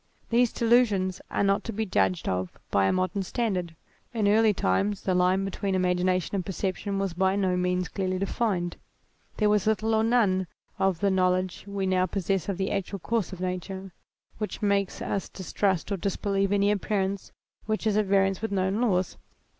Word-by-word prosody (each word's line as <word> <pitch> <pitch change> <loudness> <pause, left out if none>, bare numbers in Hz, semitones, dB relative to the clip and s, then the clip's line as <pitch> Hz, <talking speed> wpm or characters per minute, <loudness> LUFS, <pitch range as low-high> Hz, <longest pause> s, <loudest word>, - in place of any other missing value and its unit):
These 240 0 +4
delusions 220 -6 +2
are - - 0
not 195 0 +2
to - - -3
be 220 +1 -2
judged 95 - +1
of 90 0 -2
by 100 -1 +3
a - - +3
modem 185 +1 0
standard: 185 -5 -2 0.4
in 215 -3 +2
early 215 +1 +5
times 195 - 0
the 185 - +1
line 180 +2 +2
be 195 - -3
tween 195 0 -2
imagination 180 0 +1
and 195 -2 0
perception 195 +2 -3
was 195 -2 -1
by 190 +2 +2
no 190 -2 +1
means 180 0 0
clearly 185 -2 -2
defined; 190 -3 -1 0.6
there 210 - +3
was 210 0 +2
little 220 +1 +1
or 220 0 +3
none 205 -6 +2 0.3
of 190 -3 +1
the 200 -1 +3
know 185 -1 +3
ledge 185 0 -2
we 200 -1 -2
now 185 -1 +2
possess 195 -1 -1
of 195 - -2
the 190 0 -1
actual 200 0 -2
course 215 0 -1
of 185 -1 -8
nature, 185 +1 -4 0.5
which 210 0 -4
makes 200 -1 0
us 195 - -2
distrust 190 0 -1
or 200 - 0
disbelieve 195 +1 -1
any 205 0 +3
appearance 200 -1 -1 0.4
which 215 +1 -1
is 215 -2 +2
at 215 0 +2
variance 195 0 +2
with 225 - -2
known 195 +2 0
laws. 185 -6 +1
195 Hz, 185 wpm, -27 LUFS, 185-205 Hz, 0.6 s, early